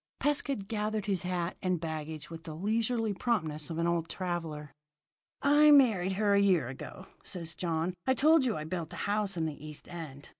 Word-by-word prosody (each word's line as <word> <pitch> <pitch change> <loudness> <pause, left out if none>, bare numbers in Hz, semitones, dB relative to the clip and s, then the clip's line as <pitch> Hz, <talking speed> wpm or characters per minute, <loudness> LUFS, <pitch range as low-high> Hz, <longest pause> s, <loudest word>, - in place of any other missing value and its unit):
Pescud 280 -7 +1
gathered 215 -1 -2
his 195 -4 +1
hat 180 -1 -2
and 185 -2 0
baggage 155 -1 -5
with 165 -1 -8
the 155 - -7
leisurely 220 +4 0
promptness 160 - -1
of 165 - -4
an 170 - +1
old 170 -1 0
traveller. 165 -5 -4 0.7
"I 295 +2 +6
married 220 -11 +5
her 205 +1 +2
a 200 - +5
year 180 -11 +3
ago," 135 +7 -8 0.2
said 170 -3 -3
John. 165 +1 -1
"I 260 - +4
told 310 +2 +5
you 240 -4 0
I 155 - -4
built 160 0 -4
a - - -4
house 205 -2 0
in 160 - 0
the 150 -2 -5
East 150 -1 -7
End. 155 -5 -8
180 Hz, 190 wpm, -31 LUFS, 160-215 Hz, 0.7 s, I